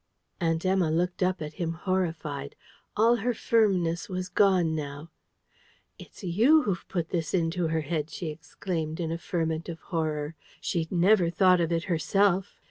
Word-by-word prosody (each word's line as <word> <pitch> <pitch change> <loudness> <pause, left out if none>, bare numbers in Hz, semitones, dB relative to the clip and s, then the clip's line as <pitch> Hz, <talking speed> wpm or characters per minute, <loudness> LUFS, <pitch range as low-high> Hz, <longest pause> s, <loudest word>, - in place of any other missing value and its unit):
Aunt 165 -1 0
Emma 185 -3 +2
looked 175 +4 0
up 185 -2 +1
at 150 0 -6
him, 165 -1 -1
horrified. 160 -6 -2 0.4
All 230 +3 +5
her 240 +2 -1
firmness 185 -8 +1
was 185 0 -3
gone 185 -4 +3
now. 150 +1 -5 0.9
"It's - - -13
YOU 235 - +4
who've 180 -4 -2
put 170 -3 -2
this 165 -1 -1
into 170 0 0
her 160 0 0
head!" 155 0 -2
she 165 +1 -5
exclaimed, 160 +1 -4
in 165 -2 -2
a 165 - -3
ferment 165 -2 -2
of 165 -1 -6
horror. 155 -3 -2 0.3
"She'd 165 -2 -2
never 180 0 +4
thought 180 +1 +4
of 165 0 0
it 165 0 0
herself. 190 +3 +1
170 Hz, 160 wpm, -27 LUFS, 160-185 Hz, 0.9 s, All